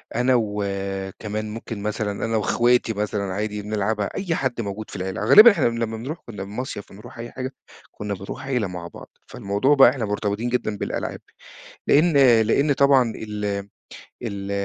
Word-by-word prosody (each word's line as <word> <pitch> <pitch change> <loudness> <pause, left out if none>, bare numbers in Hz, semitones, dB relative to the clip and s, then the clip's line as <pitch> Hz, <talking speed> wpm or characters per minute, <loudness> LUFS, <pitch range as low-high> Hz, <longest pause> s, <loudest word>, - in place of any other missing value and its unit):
أنا 125 +1 +3
وكمان 100 0 -3
ممكن 110 -1 -6
مثلًا، 105 -1 -2
أنا 115 0 0
وأخواتي 120 +2 +2
مثلًا 105 -1 -2
عادي 105 +1 -3
بنلعبها، 105 0 -1
أي 180 -4 -1
حد 130 -3 -1
موجود 105 0 -6
في - - -9
العيلة. 95 0 -4
غالبًا 220 +3 +10
إحنا 170 -8 0
لمّا 115 -1 -1
بنرُوح 135 +9 -5
كنّا 105 -4 -6
المصيف 105 +1 -6
بنرُوح 105 +4 -12
أي 120 0 -7
حاجة، 130 0 -5 0.4
كنّا 105 0 -5
بنرُوح 100 +6 -7
عيلة 125 -7 0
مع 90 -1 -7
بعض، - - -12 0.2
فالموضوع 120 +4 +1
بقى 135 -3 +8
إحنا 125 -3 -2
مرتبطين 105 +2 -2
جدًا 120 -4 -1
بالألعاب، - - -4 0.7
لإن 160 +4 +4 0.3
لإن 140 +6 +2
طبعًا 135 -4 +4
ال 105 -1 -5 0.8
ال 100 -4 -5
110 Hz, 160 wpm, -23 LUFS, 100-125 Hz, 0.8 s, غالبًا